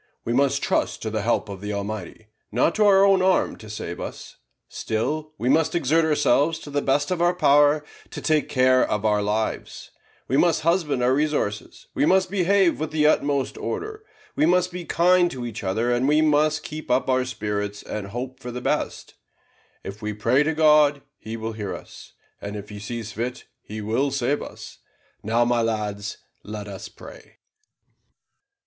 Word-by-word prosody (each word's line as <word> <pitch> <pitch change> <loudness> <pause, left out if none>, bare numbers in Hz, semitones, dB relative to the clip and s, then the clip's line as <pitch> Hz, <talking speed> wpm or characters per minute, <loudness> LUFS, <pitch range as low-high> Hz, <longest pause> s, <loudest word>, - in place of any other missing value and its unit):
We 115 - -1
must 135 +2 +2
trust - - 0
to 110 - -3
the 110 -1 -1
help 115 +1 0
of 100 -2 -8
the 105 0 -4
Almighty, 100 0 -5 0.3
not 125 +9 +2
to 215 - +2
our 195 0 +6
own 195 -1 +4
arm 185 0 +2
to 110 - -12
save 90 -5 -6
us; - - -8 0.3
still 155 +8 -3
we 120 - -3
must 160 +4 +2
exert 165 +1 +2
ourselves 155 +1 +2
to 145 - -9
the 145 0 0
best 145 +4 +1
of 180 -2 -1
our 175 +1 +3
power 145 -2 +4 0.2
to - - -7
take 155 -1 +1
care 130 0 +4
of 105 0 -1
our 105 -1 +2
lives; 105 +2 -3 0.4
we 135 - +1
must 170 0 +3
husband 155 -6 +1
our 125 +1 +3
resources, 145 -8 -2
we - - 0
must 185 0 +3
behave 195 -2 +2
with 155 0 -2
the 155 -1 +1
utmost 140 -3 +1
order, 430 0 -5 0.3
we 155 - +3
must 180 +1 +2
be 175 -1 -6
kind 175 +1 +3
to 125 -5 -6
each 110 -2 -6
other, 110 +6 0
and 120 +2 +1
we 150 +1 +4
must 155 0 +2
keep 155 +1 -8
up 125 +1 +2
our 130 -1 +2
spirits 105 -4 -4
and 105 -2 -5
hope 125 +5 -6
for 125 - -7
the 125 +1 -5
best. - - -2 0.7
If 100 +3 -8
we 105 0 -3
pray 115 +6 +2
to 155 +1 0
God, 150 -2 +4 0.2
He 110 +1 -6
will 110 0 -4
hear 105 -3 -4
us, - - -13 0.3
and 100 +1 -6
if 105 0 -8
He 105 -1 -8
sees 110 +1 -6
fit, 120 +4 -4 0.2
He 110 +1 -7
will 115 +7 0
save 140 +1 -1
us. - - -10 0.4
Now, 115 +3 +1
my 120 -1 +2
lads, 105 -2 -3 0.3
let 105 -1 -7
us 100 -1 -8
pray." - - -14
130 Hz, 185 wpm, -24 LUFS, 110-155 Hz, 0.7 s, our